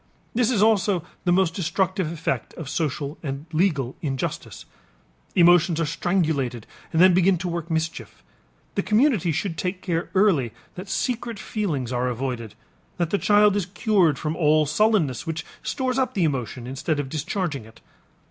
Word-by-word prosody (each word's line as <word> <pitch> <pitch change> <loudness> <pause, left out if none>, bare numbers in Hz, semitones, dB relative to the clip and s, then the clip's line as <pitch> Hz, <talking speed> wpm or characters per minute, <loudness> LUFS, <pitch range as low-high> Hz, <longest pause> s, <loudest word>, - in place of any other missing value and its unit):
This 240 0 +2
is 215 -5 +3
also 205 -5 +3 0.2
the 175 - +3
most 180 -2 +3
destructive 185 0 -1
effect 165 -1 -3
of 160 - -7
social 145 -1 -2
and 140 -1 -5
legal 155 -7 +1
injustice; 135 -4 -4 0.7
emotions 175 -1 +5
are 165 - +1
strangulated 150 - -1 0.3
and 160 - 0
then 185 +1 +7
begin 185 +1 +4
to 175 +2 -4
work 170 -1 -4
mischief. 160 0 -3 0.5
The 200 - 0
community 215 - +2
should 165 +2 -2
take 185 0 -3
care 170 -2 -2
early 165 - +3 0.2
that 185 +2 -8
secret 235 +1 -2
feelings 150 - -3
are 125 +1 0
avoided, 120 -3 -4 0.4
that 170 -2 -1
the 200 - +1
child 210 -1 +4
is 200 -4 -1
cured 185 - +2
from 155 +2 -3
all 155 -2 +3
sullenness 160 - +1
which 165 0 -3 0.2
stores 260 0 -1
up 260 - 0
the 190 - +2
emotion 130 -5 -2
instead 140 +4 -2
of 145 - -2
discharging 155 - -3
it. 110 0 -17
170 Hz, 160 wpm, -24 LUFS, 145-195 Hz, 0.7 s, then